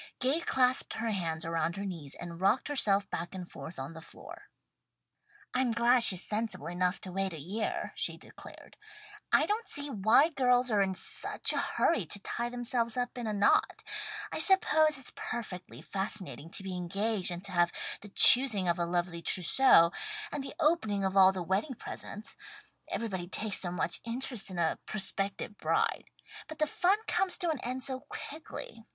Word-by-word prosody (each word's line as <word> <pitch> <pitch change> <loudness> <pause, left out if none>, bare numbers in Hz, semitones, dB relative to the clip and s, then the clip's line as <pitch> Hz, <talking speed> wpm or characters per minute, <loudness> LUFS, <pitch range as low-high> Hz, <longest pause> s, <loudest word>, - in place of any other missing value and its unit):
Gay 265 +6 +2
clasped 255 -6 +1
her 225 0 -2
hands 165 -5 -3
around 165 +1 -1
her 200 - -4
knees 165 -8 -6
and 170 0 -8
rocked 215 +9 +2
herself 205 -8 +1
back 170 +3 -5
and 180 -2 -8
forth 170 - -9
on 135 +4 -6
the 160 - -10
floor. - - -13 1.0
"I'm 255 -1 +1
glad 235 +1 +3
she's 190 -5 +5
sensible 220 +1 -2
enough 180 +2 -1
to 185 - -7
wait 195 0 -2
a 160 - -7
year," 200 +9 -3
she - - -2
declared. - - -14 0.5
"I - - +5
don't 435 +3 -2
see 285 0 0
why 220 - +4
girls 250 -4 +2
are 205 -2 +3
in 190 -1 0
such 185 - 0
a - - 0
hurry 220 - 0
to 200 - -4
tie 235 +4 -3
themselves 240 -1 -1
up 245 0 -2
in 240 -2 -5
a - - -1
knot. 205 -1 +2 0.5
I - - -3
suppose 315 -6 +4
it's 265 - -4
perfectly 180 - -7
fascinating 185 - -4
to 190 - -4
be 190 -1 -5
engaged 195 +3 -1
and 175 +1 -5
to 200 - -5
have 175 -1 +2 0.3
the 205 - -11
choosing 225 -3 +8
of 175 +1 +1
a 170 - -1
lovely 175 -1 -2
trousseau, 175 0 +4 0.4
and 290 - -4
the 275 - -8
opening 220 - +1
of 190 0 -2
all 190 -1 +7
the 185 -2 -5
wedding 195 - -1
presents. 215 -1 -8 0.5
Everybody 190 -6 -4
takes 210 +2 -1
so 180 - -3
much 175 -1 -2
interest 235 -2 -3
in 185 - -7
a 165 -2 0
prospective 200 0 -2
bride. - - 0 0.4
But 315 - -9
the 305 - +2
fun 365 +6 +1
comes 385 -1 +1
to 350 -3 -1
an 300 - -4
end 255 +1 -4
so 260 -1 -1
quickly. 285 -4 -9
205 Hz, 180 wpm, -30 LUFS, 180-255 Hz, 1.0 s, choosing